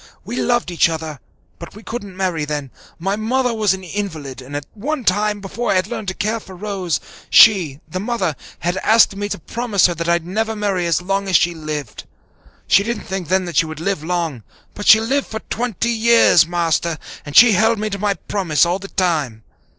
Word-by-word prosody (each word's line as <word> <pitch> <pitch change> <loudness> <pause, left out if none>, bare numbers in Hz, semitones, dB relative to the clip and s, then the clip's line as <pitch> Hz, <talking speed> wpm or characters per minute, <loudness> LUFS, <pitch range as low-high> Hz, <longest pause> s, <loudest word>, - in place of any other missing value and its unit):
We 225 +5 -5
loved 240 -6 0
each 170 0 +3
other, 160 -3 -5 0.4
but 170 - -10
we 215 - -12
couldn't 205 -5 -7
marry 180 -5 -1
then. 145 -3 -4 0.3
My 195 +4 -1
mother 245 +3 0
was 215 -3 +1
an 190 - -11
invalid, 160 -8 -5
and 140 +3 -5
one 270 +6 -3
time, 210 +1 +1
before 230 +4 -4
I - - +2
had 185 -1 +2
learned 210 0 -6
to 185 - -3
care 220 +2 -1
for 190 -3 -12
Rose, 190 -3 -2 0.3
she, 170 -10 +6
the 185 - -4
mother, 195 -7 -1 0.3
had 175 +2 -1
asked 220 0 +4
me 205 +1 -4
to - - -3
promise 220 +3 0
her 175 - +3
that 170 0 -3
I'd 170 -1 +1
never 220 +5 -2
marry 195 -4 -1
as 170 +1 +1
long 195 +1 -1
as 190 - +1
she 175 +2 +4
lived. 155 -7 -6 0.6
She - - +4
didn't 235 +3 -3
think 190 -4 -4
then 185 +2 +1
that 175 -4 -5
she 165 - +3
would 155 -1 -7
live 180 -2 -2
long, 165 -7 -2 0.3
but 205 - -6
she 220 - +9
lived 265 +5 -1
for 220 -1 -6
twenty 235 -1 -1
years, 230 -7 +5
Master, 170 -1 0 0.3
and 145 -1 -9
she 240 -1 +9
held 220 +3 +3
me 215 0 -3
to 200 - -4
my 205 0 0
promise 180 -8 +1
all 175 +3 -1
the 195 - -8
time. 150 - -1
190 Hz, 210 wpm, -19 LUFS, 170-215 Hz, 0.6 s, she